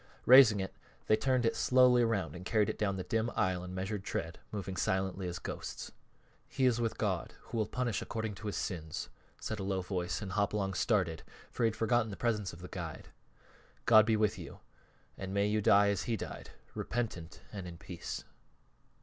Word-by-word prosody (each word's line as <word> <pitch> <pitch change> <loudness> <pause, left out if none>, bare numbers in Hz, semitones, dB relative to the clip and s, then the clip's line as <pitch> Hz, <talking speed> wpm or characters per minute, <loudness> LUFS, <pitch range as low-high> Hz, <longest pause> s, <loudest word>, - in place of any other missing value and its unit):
Raising 125 -5 +8
it 95 0 -3 0.3
they 110 - +5
turned 130 +1 +1
it 115 - +2
slowly 125 -1 +5
around 100 - 0
and 90 - -8
carried 105 +1 +2
it - - -11
down 100 -2 +1
the 95 - -3
dim 115 +3 0
aisle 90 -1 +1
in 90 0 -7
measured 95 +1 -3
tread, 85 -3 -4
moving 100 -3 -4
silently 95 0 -1
as 90 0 -4
ghosts. - - -6 0.6
"He 130 - 0
is 120 -2 +3
with 115 -1 -1
God, 95 -6 -1
Who 115 - -2
will 110 - +1
punish 120 -6 -1
according 110 -1 -3
to 105 - -7
his 105 - -2
sins," 80 -5 -4 0.3
said - - -4
a - - -3
low 95 -1 -1
voice, 90 -1 -2
and 100 -3 -5
Hopalong 100 0 0
started, 95 -4 +1 0.3
for 120 - 0
he - - +6
had 110 - -2
forgotten 115 0 +2
the 100 - -7
presence 105 -5 0
of 85 - -12
the - - -6
guide. 85 -5 -7 0.8
"God 110 -1 +7
be 110 -1 +3
with 105 -1 +1
you, - - -9 0.6
and 95 +1 -4
may 100 0 +3
you 105 +1 +1
die 100 0 +5
as 100 -3 0
he 115 -2 0
died - - -7 0.2
repentant 110 -9 -4
and 95 -3 -5
in 85 -1 -8
peace." 85 0 -6
100 Hz, 200 wpm, -33 LUFS, 95-115 Hz, 0.8 s, Raising